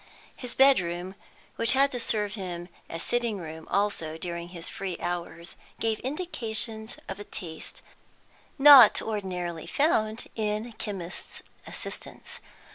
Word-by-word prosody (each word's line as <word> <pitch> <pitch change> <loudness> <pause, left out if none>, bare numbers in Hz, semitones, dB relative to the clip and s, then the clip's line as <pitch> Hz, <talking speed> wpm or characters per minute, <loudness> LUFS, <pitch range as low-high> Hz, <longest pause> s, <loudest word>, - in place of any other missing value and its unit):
His 250 -2 -4
bed 270 0 +7
room, 175 +1 -4 0.4
which 230 - +5
had 275 +1 +4
to 245 - -3
serve 210 -3 0
him 180 -4 -5 0.2
as 165 - -4
sitting 235 -3 0
room 160 -2 -8
also 195 -6 0
during 170 0 -5
his 175 -1 -6
free 190 -3 -4
hours, 175 -1 -4 0.2
gave 225 -1 0
indications 235 -8 -3
of 195 - -6
a - - -5
taste 165 -5 -8 0.7
not 275 -6 +10
ordinarily 180 -6 -3
found 225 -7 +1
in 215 +1 -2
chemists' 190 -4 -5 0.2
assistants. - - -5
205 Hz, 125 wpm, -28 LUFS, 175-230 Hz, 0.7 s, not